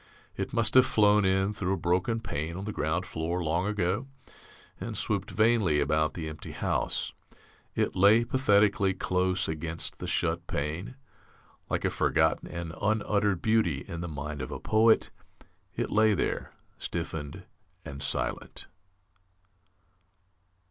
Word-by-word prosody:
It - - -3
must 115 -1 +1
have 130 -1 +7
flown 105 -1 +4
in 95 +2 +2
through 95 -2 -1
a - - -1
broken 90 +7 0
pane 85 -4 -4
on 95 - -5
the 105 - -3
ground 85 0 -1
floor 85 0 -2
long 85 +4 0
ago 105 +4 -1 0.7
and - - -4
swooped 100 -3 -1
vainly 110 -9 +3
about 75 +1 +1
the 80 -3 -4
empty 75 -1 -8
house. - - -1 0.6
It - - 0
lay, 105 +5 +6
pathetically, 105 -6 +3
close 90 0 0
against 80 +1 -4
the - - -5
shut 85 0 -1
pane. 80 - -3 0.7
Like - - -1
a - - +1
forgotten - - +1
and 85 -2 -5
un 105 0 +1
uttered 100 -3 +1
beauty 110 -11 +1
in 85 -3 -5
the 85 - -4
mind 75 -1 -5
of 65 - -5
a - - -5
poet, 110 +1 +3 0.6
it - - -2
lay 110 0 +4
there, - - -2 0.3
stiffened 80 -4 -5 0.4
and 70 0 -7
silent. 70 - -2
90 Hz, 140 wpm, -28 LUFS, 80-105 Hz, 0.7 s, have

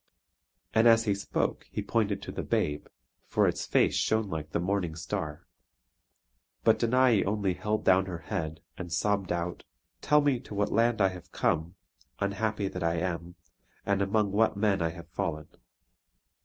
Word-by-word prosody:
And 110 +1 +5
as 115 0 +6
he 105 - +2
spoke 100 0 -2
he - - -3
pointed 100 -3 0
to - - -6
the - - -4
babe; 75 0 -1 0.4
for - - +2
its - - -2
face - - +3
shone 110 -3 +1
like 75 -1 -4
the - - -1
morning 90 -2 -1
star. 85 -3 -4 1.2
But - - +4
Danae 120 -2 +4
only 100 -2 0
held 105 +4 -2
down 95 0 +4
her 90 -2 -4
head, 80 0 -4 0.2
and 90 -2 -6
sobbed 100 +3 0
out: 85 0 -3 0.4
"Tell 150 0 +4
me 140 -4 +2
to 115 -4 -10
what 100 0 0
land 115 0 +2
I 95 - +5
have 90 -2 -11
come, 80 +4 0 0.4
unhappy 100 +1 -1
that 90 -1 -5
I 85 0 +1
am; 85 0 -3 0.5
and 100 -1 +1
among 100 +1 +1
what 105 0 +2
men 100 -2 +2
I 85 - +1
have 85 -1 -10
fallen!" 75 -2 -3
100 Hz, 170 wpm, -29 LUFS, 85-105 Hz, 1.2 s, as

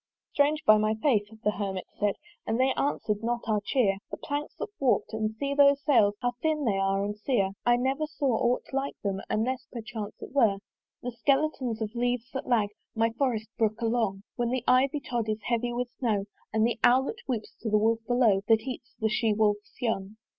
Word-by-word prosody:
"Strange, 300 +2 +2
by 215 0 +7
my 215 +1 +1
faith!" 220 -3 +2 0.2
the 210 - +3
Hermit 195 -2 -3
said 205 -1 +1 0.3
"And 225 +2 0
they 265 +1 +3
answer'd 215 -7 -1
not 235 +1 0
our 210 -2 +1
cheer. 205 -4 +2
"The - - -5
planks 290 +1 -4
look - - -4
warp'd, 260 -4 +1
and 220 0 -2
see 280 +4 -2
those 280 0 +5
sails 215 -9 +4
"How 245 - +2
thin 310 -2 0
they 200 -4 +1
are 195 +1 +1
and 205 0 -3
sere! 210 -3 0 0.2
"I 240 - +6
never 265 +5 0
saw 280 -5 0
aught 245 -1 +1
like 275 +1 -1
to - - -58
them 195 0 -3
"Unless 255 +4 -1
perchance 220 -3 -6
it - - -9
were 230 -8 +3 0.5
"The 250 - -3
skeletons 260 -2 0
of 215 0 -5
leaves 245 0 -1
that 265 - -4
lag 225 -5 +2 0.3
"My 225 0 +2
forest 230 -3 -1
brook 220 -1 +1
along: 225 -4 0
"When 240 -1 0
the 250 -1 -1
Ivy 265 +3 +3
tod 235 -4 -2
is 215 0 -2
heavy 240 +2 0
with 245 0 -3
snow, 215 -6 0 0.3
"And 220 0 +2
the 235 0 -1
Owlet 265 - +3
whoops 230 -5 -3
to 225 - -2
the 215 - +4
wolf 225 +2 +2
below 240 -6 +3
"That 225 -1 +5
eats 250 -1 -7
the 220 - +2
she 220 0 +1
wolf's 210 -1 0
young. 210 -3 -2
235 Hz, 205 wpm, -28 LUFS, 215-260 Hz, 0.5 s, by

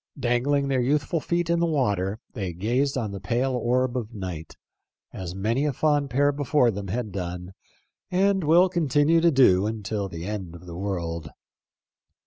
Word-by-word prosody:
Dangling 135 +3 +1
their 135 -2 +1
youthful 145 +6 +1
feet 170 +2 -1
in 170 0 +1
the 170 - +2
water, 105 - 0
they 95 -6 -4
gazed 125 +10 0
on 110 -5 -2
the 100 - -6
pale 125 +5 0
orb 125 +1 0
of 115 -2 -4
night, 90 -6 -6 0.6
as 90 -1 -6
many 115 +8 0
a 150 - +1
fond 145 0 +1
pair 140 +4 +3
before 145 -3 +2
them 100 -1 -6
had 110 +2 -3
done 90 -1 -5 0.6
and 190 +1 +2
will 170 +5 +5
continue 165 -2 +2
to 170 - +5
do 105 - +4
until 105 -2 -3
the 85 -1 -7
end 95 -5 -5
of 85 - -12
the 85 -1 -8
world. 85 -4 -3
120 Hz, 170 wpm, -25 LUFS, 95-145 Hz, 0.6 s, will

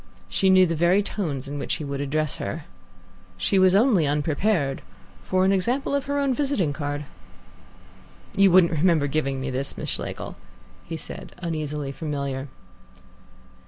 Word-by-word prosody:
She 190 - +2
knew 185 0 +7
the 165 - -1
very 175 +5 +3
tones 150 -10 -3
in 145 +1 -5
which - - -1
he 160 - -6
would 140 -1 -3
address 150 +1 -1
her. 155 -1 -5 0.7
She 95 - +2
was 185 0 +5
only 205 - +4
unprepared 150 +1 0 0.4
for 185 0 +2
an 190 - +4
example 245 +9 0
of 280 -1 0
her 285 0 -1
own 280 -2 +2
visiting 250 - 0
card. 145 0 -3 1.3
"You 195 0 +6
wouldn't 180 -1 +6
remember 160 -2 +3
giving 140 -2 -1
me 135 0 -3
this, 135 +2 -3
Miss - - -4
Schlegel?" - - -4 0.6
said 160 - -8
he, 175 - -5
uneasily 150 -3 -3
familiar. 140 -2 -4
160 Hz, 155 wpm, -24 LUFS, 145-190 Hz, 1.3 s, knew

